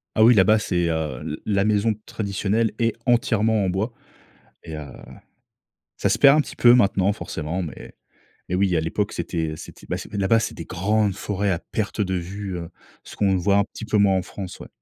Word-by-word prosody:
Ah 110 - +5
oui, 120 +2 +7
là-bas, 105 +2 +5
c'est, 85 -5 0
heu, 80 -1 -2
l 75 - -4
la 100 -2 +2
maison 105 +1 +2
traditionnelle 105 +2 -1
est 115 -1 +1
entièrement 110 -3 +2
en - - 0
bois 100 +6 -1 0.7
et 80 - -7
heu, 75 - -6 1.1
ça - - 0
se - - +1
perd 140 0 +7
un - - +5
petit - - -6
peu 120 0 +7
maintenant 100 -4 +3
forcément, 85 -3 -4
mais 80 - -8 0.5
mais 90 - -1
oui, 95 -1 +2
à - - +3
l'époque, 100 +6 -2
c'était 80 -3 -3
c'était - - -12
ben - - -2
c'est - - -10
là-bas, 100 +2 +3
c'est 110 - -3
des - - -6
grandes 105 +3 0
forêts 100 -1 -1
à 85 - -1
perte 110 +3 -4
de 95 -2 0
vue, 95 +2 -4
heu, 85 -1 -6 0.3
ce - - -11
qu'on 100 -2 +2
voit 100 +2 +2
un 100 - +4
petit 110 - -11
peu 110 - +1
moins 100 -2 +4
en 95 - +1
France, 95 0 -8
ouais. - - -9
100 Hz, 210 wpm, -23 LUFS, 90-110 Hz, 1.1 s, oui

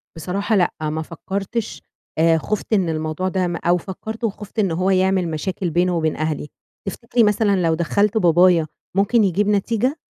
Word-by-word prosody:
بصراحة 195 +7 -1
لأ، 175 -3 +2 0.2
ما 155 +1 -2
فكّرتش 195 +7 -4 0.4
آآ، 165 0 +4
خُفت 215 +6 -3
إن 190 -5 +2
الموضوع 155 +3 -2
ده 185 -1 0
م 175 - -3
أو 175 +1 +1
فكّرت 220 +6 -7
وخُفت 210 0 -4
إن 195 -4 +2
هو 180 +4 0
يعمل 190 -1 +2
مشاكل 180 +3 -3
بينه 175 +2 +1
وبين 160 -1 0
أهلي. 155 -1 -2 0.4
تفتكري 235 +3 0
مثلًا 210 -1 +3
لو 165 -1 +2
دخّلت 200 +6 +1
بابايا 175 -3 +4 0.3
ممكن 210 +3 +3
يجيب 200 +2 +1
نتيجة؟ 230 +7 +1
185 Hz, 165 wpm, -21 LUFS, 165-205 Hz, 0.4 s, آآ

